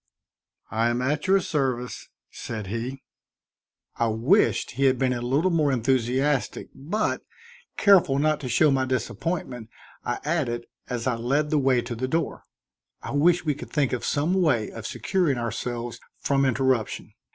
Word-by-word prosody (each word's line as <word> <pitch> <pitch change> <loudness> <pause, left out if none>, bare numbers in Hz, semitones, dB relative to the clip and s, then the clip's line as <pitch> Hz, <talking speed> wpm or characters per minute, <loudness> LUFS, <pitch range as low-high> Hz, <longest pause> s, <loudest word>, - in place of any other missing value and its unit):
"I 115 +2 +2
am 120 +1 0
at 150 +5 -1
your 195 +1 +5
service," 130 -8 -2 0.2
said 110 -2 -6
he. 115 +6 -5 0.9
I 115 - +2
wished 120 - +2
he 135 +3 0
had 130 -1 +4
been 130 -1 +1
a 120 - -3
little 140 +9 +1
more 155 -4 +2
enthusiastic, 130 +3 0
but, 170 +11 -2 0.6
careful 180 -9 +5
not 155 +1 +2
to 130 - -5
show 145 +5 +4
my 130 -1 +2
disappointment, 130 -2 -3 0.3
I 120 - -2
added, 130 -7 -1 0.2
as 120 -2 -3
I 130 - +2
led 135 +6 0
the 155 - +3
way 130 -3 +2
to 120 - -5
the 125 +3 -3
door: 165 +5 -2 0.6
"I - - -5
wish 170 +5 +3
we 150 - +2
could - - -9
think 145 -5 0
of 125 - -2
some 150 +5 0
way 150 - +2
of 115 0 -7
securing 175 -9 0
ourselves 120 +1 -4 0.2
from 140 -1 +1
interruption. 130 -3 0
130 Hz, 160 wpm, -25 LUFS, 120-150 Hz, 0.9 s, your